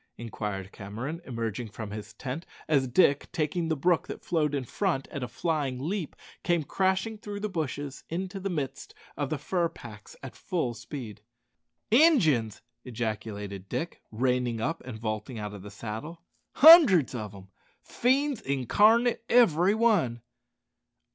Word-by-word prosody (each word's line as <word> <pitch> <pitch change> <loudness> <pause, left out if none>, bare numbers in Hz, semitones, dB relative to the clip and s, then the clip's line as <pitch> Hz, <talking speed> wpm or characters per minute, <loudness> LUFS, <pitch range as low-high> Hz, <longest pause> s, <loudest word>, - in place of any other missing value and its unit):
inquired 105 -4 -5
Cameron, 120 - -6
emerging 115 -1 -4
from 105 0 -7
his 105 +1 -7
tent 135 +5 -5 0.2
as 140 -4 +2
Dick, 140 +2 +3
taking 165 0 -1
the 160 - 0
brook 170 +4 +1
that - - -8
flowed 150 -4 +1
in 135 - -1
front 165 - -1
at 140 - -6
a 125 - -3
flying 145 -6 -2
leap, 165 +4 -3 0.3
came 170 -3 +1
crashing 190 +6 0
through 205 -1 -6
the 215 - -2
bushes 145 -5 -4
into 185 +4 -4
the 195 +1 -3
midst 140 -6 -4 0.2
of 145 -2 -2
the 155 - -1
fur 170 +2 0
packs 105 -8 -12
at 130 - -8
full 160 -10 -2
speed. 115 -4 -8 0.7
"Injuns!" 170 - +4 0.2
ejaculated 105 -5 -5
Dick, 170 +1 -4
reining 125 0 0
up, 160 +9 -2
and 120 -4 -6
vaulting 110 +2 -4
out 105 -1 -5
of 100 - -9
the 105 - -9
saddle. 115 +11 -7 0.3
"Hundreds 280 - +8
of 105 -4 -5
'em. 95 -1 -13 0.3
Fiends 270 +1 +1
incarnate 210 - +3
every 200 -5 +5
one!" 180 - +2
140 Hz, 150 wpm, -28 LUFS, 115-180 Hz, 0.7 s, Hundreds